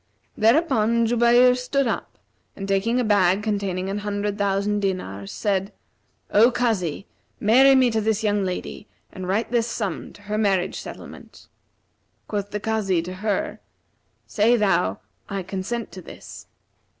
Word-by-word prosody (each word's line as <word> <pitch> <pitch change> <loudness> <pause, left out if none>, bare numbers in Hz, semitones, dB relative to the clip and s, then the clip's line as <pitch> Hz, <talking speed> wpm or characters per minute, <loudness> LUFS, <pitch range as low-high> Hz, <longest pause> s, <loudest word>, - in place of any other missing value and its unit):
Thereupon 230 -2 +3
Jubayr 240 +2 +5
stood 260 +2 -1
up 230 - -3 0.4
and 195 - -6
taking 200 +5 +1
a - - +1
bag 200 -2 +3
containing 200 -3 -2
an 200 +1 -2
hundred 205 0 -2
thousand 200 0 0
dinars, 100 - -3
said, 195 -1 -1 0.6
O 225 +4 +6
Kazi, 200 - -1 0.3
marry 265 +6 +6
me 255 -2 +4
to 220 -1 0
this 220 0 0
young 205 -1 +1
lady 185 +3 -5 0.2
and 185 -2 -7
write 215 +5 -1
this 235 -1 +1
sum 205 -7 -4
to 205 - -17
her 210 +1 -2
marriage 195 -4 +1
settlement.' - - -11 0.8
Quoth 205 -1 -3
the 210 - -4
Kazi 205 -5 0
to 180 +2 -6
her, 215 +11 -2 0.7
'Say 230 +3 +2
thou, 170 - +1 0.3
I 195 -2 -3
consent 195 +5 -4
to 185 - -9
this.' - - -12
205 Hz, 145 wpm, -23 LUFS, 195-230 Hz, 0.8 s, O